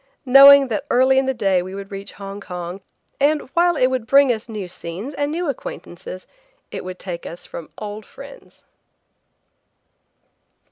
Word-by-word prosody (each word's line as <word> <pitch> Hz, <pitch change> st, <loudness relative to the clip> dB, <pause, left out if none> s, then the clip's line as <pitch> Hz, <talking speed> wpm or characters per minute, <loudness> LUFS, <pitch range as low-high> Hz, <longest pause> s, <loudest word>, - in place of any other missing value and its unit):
Knowing 275 Hz, +1 st, +9 dB
that 225 Hz, +6 st, -3 dB
early 260 Hz, +2 st, +4 dB
in 265 Hz, -, -1 dB
the -, -, +2 dB
day 195 Hz, -7 st, +1 dB
we 185 Hz, +2 st, -7 dB
would 200 Hz, 0 st, -8 dB
reach 195 Hz, 0 st, -8 dB
Hong 200 Hz, 0 st, -8 dB
Kong, 180 Hz, 0 st, -7 dB, 0.4 s
and 295 Hz, +2 st, +2 dB
while 345 Hz, 0 st, +3 dB
it 255 Hz, -, +3 dB
would 255 Hz, -3 st, -1 dB
bring 275 Hz, 0 st, +5 dB
us 225 Hz, +1 st, -8 dB
new 210 Hz, -4 st, -5 dB
scenes 180 Hz, -, -7 dB
and 285 Hz, +1 st, -2 dB
new 345 Hz, +2 st, -2 dB
acquaintances, 185 Hz, -8 st, -7 dB, 0.5 s
it -, -, -6 dB
would 185 Hz, 0 st, -7 dB
take 175 Hz, -2 st, -7 dB
us 170 Hz, -, -9 dB
from 165 Hz, -, -9 dB
old 210 Hz, +1 st, -7 dB
friends. -, -, -14 dB
220 Hz, 160 wpm, -21 LUFS, 185-275 Hz, 0.5 s, Knowing